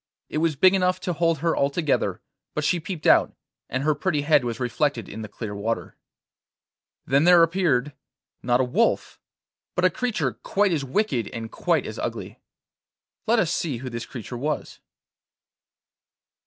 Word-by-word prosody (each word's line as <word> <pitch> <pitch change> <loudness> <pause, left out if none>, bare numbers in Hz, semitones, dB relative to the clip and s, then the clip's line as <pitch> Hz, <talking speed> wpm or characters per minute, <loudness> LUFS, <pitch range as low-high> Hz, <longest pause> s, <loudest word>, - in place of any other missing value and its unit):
It 155 - -2
was 160 -1 +1
big 185 +7 +5
enough 185 -1 +2
to 180 - -2
hold 165 0 +1
her 165 - +2
altogether, 145 +2 0 0.3
but 150 - -1
she 175 +4 +2
peeped 165 -1 -6
out, - - +5 0.3
and 130 +1 -2
her 155 +1 +3
pretty 150 0 -1
head 150 -2 +4
was 115 -2 -3
reflected 125 0 -1
in 110 - -7
the 110 - -6
clear 105 0 -6
water. 110 +3 -3 1.1
Then 140 +3 +3
there 175 -1 +7
appeared, 160 -6 +1 0.5
not 120 0 +2
a - - +3
wolf, 125 - 0 0.6
but 180 - +2
a 185 - +4
creature 245 +4 -1
quite 200 -1 0
as 155 -5 0
wicked 130 - 0
and 115 -2 -7
quite - - 0
as - - -6
ugly. - - -5 0.9
Let 235 +2 +4
us 180 -7 +2
see 150 -8 -2
who 130 +2 -7
this 115 +1 -5
creature 120 -1 -7
was. 150 +3 -3
150 Hz, 165 wpm, -24 LUFS, 125-175 Hz, 1.1 s, there